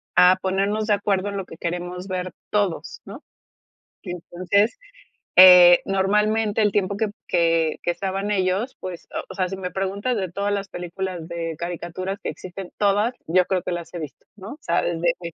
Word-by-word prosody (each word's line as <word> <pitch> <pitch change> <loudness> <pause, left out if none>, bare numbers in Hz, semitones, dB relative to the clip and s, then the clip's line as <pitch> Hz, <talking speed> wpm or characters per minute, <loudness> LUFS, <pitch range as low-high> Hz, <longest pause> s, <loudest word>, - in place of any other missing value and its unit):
a 180 +1 +7
ponernos 200 +3 0
de 210 - +3
acuerdo 200 -1 0
en 200 - -4
lo 195 - -4
que 165 - -12
queremos 180 +2 -4
ver 185 -1 -3 0.2
todos, 205 -5 -1
¿no?, - - -10 0.8
entonces, 185 - -1 0.6
eh, 180 -1 +10
normalmente 210 +3 +1
el 210 - +3
tiempo 200 0 0
p 220 - +1 0.2
que 165 -2 +2
que 175 - +1
estaban 195 +3 -3
ellos, 195 +5 0
pues, 185 -2 -7
o - - -3
o - - -9
sea, 185 -2 0
si 190 - -4
me 185 -1 -4
preguntas 200 +6 -2
de 190 -4 -3
todas 200 +3 -2
las 200 -1 -2
películas 180 -1 -5
de 165 -1 -4
caricaturas 175 +3 -4
que - - -2
existen, 185 0 -8
todas, 205 +4 +2
yo 180 +3 +3
creo 185 -1 0
que - - -3
las 170 -1 -5
he 175 - -5
visto, 150 -3 -9
¿no?, 210 +7 -9
sabes 170 - 0
desde 170 0 -1
185 Hz, 180 wpm, -23 LUFS, 175-200 Hz, 0.8 s, eh